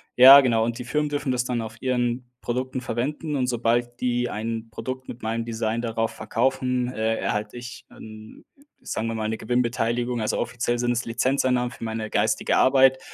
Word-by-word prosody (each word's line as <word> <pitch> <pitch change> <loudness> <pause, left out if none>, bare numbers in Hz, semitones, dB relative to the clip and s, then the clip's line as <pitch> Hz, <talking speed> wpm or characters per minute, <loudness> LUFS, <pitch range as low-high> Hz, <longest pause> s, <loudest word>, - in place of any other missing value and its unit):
Ja, 135 +3 +10
genau, 115 -4 +2
und 115 +1 -2
die 125 - -5
Firmen 150 +4 -1
dürfen 145 -2 -2
das 125 -1 0
dann 125 -2 -2
auf 110 +1 -8
ihren 125 -1 -1
Produkten 130 +1 -3
verwenden 145 +6 -3
und 130 -2 0
sobald 120 0 0
die 120 -1 0
ein 115 +1 -4
Produkt 130 +3 -6
mit 120 - -9
meinem 115 +1 -1
Design 115 0 -2
darauf 115 -1 -1
verkaufen, 125 +2 -1
äh, 110 +1 0
erhalte 105 +3 -3
ich 120 0 -9
'n 110 0 -12 0.4
sagen 110 +1 -3
wir 115 - -3
mal, 110 -1 -2
'ne 110 0 -2
Gewinnbeteiligung. 120 0 0
Also, 105 - -1
offiziell 120 +1 -1
sind 120 0 0
es 120 +1 -1
Lizenzeinnahmen 125 +1 +1
für 115 - -10
meine 110 -1 -4
geistige - - +1
Arbeit. 130 0 +5
120 Hz, 185 wpm, -24 LUFS, 115-125 Hz, 0.4 s, Ja